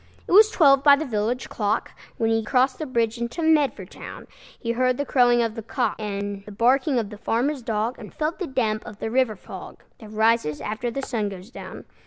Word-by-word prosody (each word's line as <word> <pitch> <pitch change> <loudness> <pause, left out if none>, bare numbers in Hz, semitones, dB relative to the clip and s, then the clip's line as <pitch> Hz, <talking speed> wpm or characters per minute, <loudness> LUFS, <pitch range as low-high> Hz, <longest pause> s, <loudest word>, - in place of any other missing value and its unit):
It - - -6
was 425 +4 +8
twelve 275 -9 +5
by 285 -1 +8
the 310 +3 -3
village 235 0 -2
clock, 210 0 -1 0.3
When 225 0 +1
he 225 0 +1
crossed 255 +3 +1
the 310 - -4
bridge 235 -2 0
into 235 +8 -3
Medford 285 - +2
town. - - -9 0.3
He 230 - -2
heard 255 +1 +1
the 285 - -2
crowing 245 -3 +4
of 225 -1 -2
the 225 - -6
cock, 230 0 -1
And 200 -1 -4
the - - -8
barking 260 +6 +2
of 220 -3 -2
the 210 - -10
farmer's 260 +6 0
dog, 225 +1 -2
And 215 - -10
felt 310 +4 -3
the 365 - -3
damp 225 -5 -1
of 205 - -10
the 220 - -4
river 250 -3 +2
fog, - - -11 0.2
That 215 - -11
rises 220 -8 +1
after 215 +3 -3
the 275 +4 -4
sun 220 -6 -2
goes 195 +3 -10
down. - - -9
235 Hz, 220 wpm, -24 LUFS, 215-265 Hz, 0.3 s, was